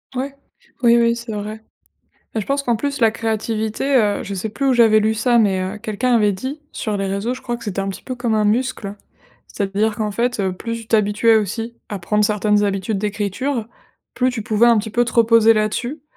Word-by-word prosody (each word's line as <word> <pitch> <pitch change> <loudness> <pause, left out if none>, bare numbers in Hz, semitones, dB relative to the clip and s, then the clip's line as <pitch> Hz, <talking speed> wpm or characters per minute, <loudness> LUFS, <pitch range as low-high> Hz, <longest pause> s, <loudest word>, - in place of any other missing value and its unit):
Ouais. 275 +2 -3 0.5
Oui, 235 -1 +5
oui, 235 0 +3
c'est 235 -1 -7
vrai. 215 +1 -5 0.7
Bah, 220 - 0
je 200 - -6
pense 280 0 0
qu'en 240 -3 +1
plus, 280 +4 -3
la 225 -2 +5
créativité, 220 +4 -1
heu, 210 -4 +2
je 200 - -5
sais 195 +3 -3
plus 275 +6 -2
où 265 - +4
j'avais 225 -2 +5
lu 220 +1 +1
ça 235 +2 +2
mais 195 -4 +2
heu, 190 +3 -4
quelqu'un 235 +3 -1
avait 210 -3 +3
dit 260 +10 -5
sur 215 -2 -3
les 195 0 -2
réseaux, 200 +6 -2
je 255 - -10
crois, 240 -1 -3
que 235 - -12
c'était 200 -3 -3
un 195 - -2
petit 195 - -6
peu 255 - -5
comme 245 -3 -1
un 215 -1 +2
muscle. 215 -2 -1 0.5
C'est-à-dire 205 +2 -1
qu'en 210 -1 -1
fait, 240 +2 -1
heu, 190 -1 0
plus 230 +5 -5
tu 220 - -15
t'habituais 220 +1 +3
aussi 225 +3 -2
à 205 - -4
prendre 210 +4 +1
certaines 210 0 +2
habitudes 195 +1 -1
d'écriture, 215 +5 -2 0.5
plus 255 0 +2
tu 240 -3 -4
pouvais, 215 +2 +3
un 235 -2 +5
petit 220 +1 -3
peu, 240 +3 +2
te 235 - -5
reposer 230 -1 +5
là-dessus, 240 +7 -2
220 Hz, 225 wpm, -20 LUFS, 205-240 Hz, 0.7 s, Oui